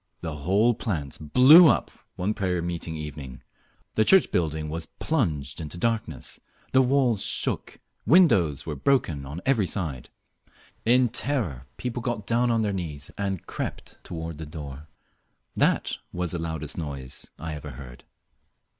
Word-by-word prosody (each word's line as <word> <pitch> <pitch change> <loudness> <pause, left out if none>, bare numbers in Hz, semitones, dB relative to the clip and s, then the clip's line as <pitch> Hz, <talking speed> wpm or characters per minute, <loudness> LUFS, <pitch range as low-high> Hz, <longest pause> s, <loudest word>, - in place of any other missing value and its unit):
The 80 -2 -4
whole 100 +10 +3
plant 80 - -4
blew 155 +7 +9
up - - +2 0.2
one 95 +4 -1
prayer 90 -4 -1
meeting 85 -1 -4
evening. 75 -4 -7 0.5
The 110 - +3
church 190 - +5
building 80 -2 0
was 80 +2 -4
plunged 80 - -2
into 80 +2 -6
darkness, 115 +3 -2 0.3
the 130 - +6
walls 125 -5 +2
shook, - - -2 0.3
windows 90 - +4
were 75 - -3
broken 75 - +1
on 75 +6 -6
every 120 -8 +2
side. 80 -9 -3 0.8
In 125 +1 +5
terror 100 - -2
people 125 -1 -3
got 115 -4 -3
down 120 +2 +2
on 115 -1 +2
their 105 -2 0
knees 75 -6 -5
and 95 -3 -3
crept - - -6
toward 80 -2 -6
the 80 - -5
door. 75 -1 -8 0.7
That - - +1
was 90 -1 -2
the 85 - -2
loudest 80 -1 -4
noise 70 -5 -6
I 80 -1 -5
ever 75 - -7
heard. 65 -3 -10
85 Hz, 145 wpm, -26 LUFS, 75-115 Hz, 0.8 s, blew